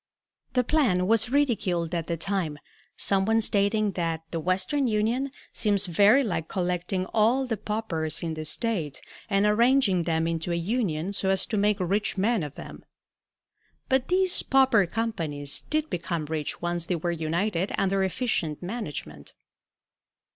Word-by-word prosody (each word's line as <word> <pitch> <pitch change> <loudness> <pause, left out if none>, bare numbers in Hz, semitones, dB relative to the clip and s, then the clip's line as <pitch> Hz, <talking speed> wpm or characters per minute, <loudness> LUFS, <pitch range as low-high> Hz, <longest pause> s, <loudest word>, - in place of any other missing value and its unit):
The 250 - +3
plan 230 - +2
was 225 +3 +2
ridiculed 200 - 0
at 170 -2 -2
the 170 - -2
time, 180 -5 -2 0.4
some 195 -1 +3
one 225 +3 +2
stating 210 0 +2
that 165 -3 -2
"The 165 - -2
Western 185 - 0
Union 230 +5 0 0.2
seems 205 -3 +1
very 205 +9 +5
like 175 -8 -2
collecting 180 0 -1
all 235 +5 +3
the 240 -3 -1
paupers 175 -8 -3
in 165 -1 -2
the 155 0 -5
State 160 - -1 0.3
and 200 0 +2
arranging 230 -3 +3
them 160 -1 +1
into 165 +1 -2
a - - +1
union 180 -2 -1
so 190 -1 -1
as 190 -1 +2
to 220 - -3
make 205 0 +2
rich 200 +3 0
men 215 +2 +2
of 145 -2 -6
them." - - -10 1.1
But 265 -1 +2
these 370 0 +3
pauper 260 -8 +4
companies 165 -10 -2
did 310 0 0
become 170 -2 -2
rich 155 0 -4
once 175 -1 -1
they 180 - 0
were 170 +1 -2
united 170 +4 -1
under 195 0 +1
efficient 185 - -1
management. 150 - -6
195 Hz, 155 wpm, -26 LUFS, 170-225 Hz, 1.1 s, very